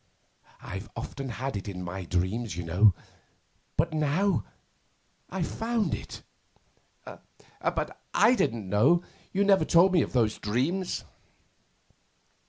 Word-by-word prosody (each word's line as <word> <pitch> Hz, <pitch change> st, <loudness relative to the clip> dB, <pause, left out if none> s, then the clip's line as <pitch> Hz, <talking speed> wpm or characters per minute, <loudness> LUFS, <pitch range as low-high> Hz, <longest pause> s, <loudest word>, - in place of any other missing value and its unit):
I've 100 Hz, +2 st, -6 dB
often 135 Hz, -1 st, -5 dB
had 130 Hz, +1 st, -4 dB
it 100 Hz, -, -5 dB
in 90 Hz, -2 st, -5 dB
my 90 Hz, +1 st, -5 dB
dreams, 95 Hz, +3 st, -1 dB
you 90 Hz, -, -3 dB
know, 90 Hz, +4 st, +4 dB, 0.8 s
but 165 Hz, +2 st, +1 dB
now 155 Hz, +6 st, +1 dB, 0.9 s
I've -, -, -2 dB
found 225 Hz, -2 st, -1 dB
it.' -, -, -6 dB, 0.8 s
'But -, -, -5 dB
I 245 Hz, -, +5 dB
didn't 115 Hz, -, 0 dB
know. 135 Hz, -, +4 dB, 0.3 s
You 200 Hz, +1 st, +2 dB
never 195 Hz, -1 st, +5 dB
told 185 Hz, +2 st, +5 dB
me 175 Hz, -, +5 dB
of -, -, -3 dB
those 115 Hz, -4 st, +2 dB
dreams. 145 Hz, -, -1 dB
125 Hz, 120 wpm, -28 LUFS, -, 0.9 s, I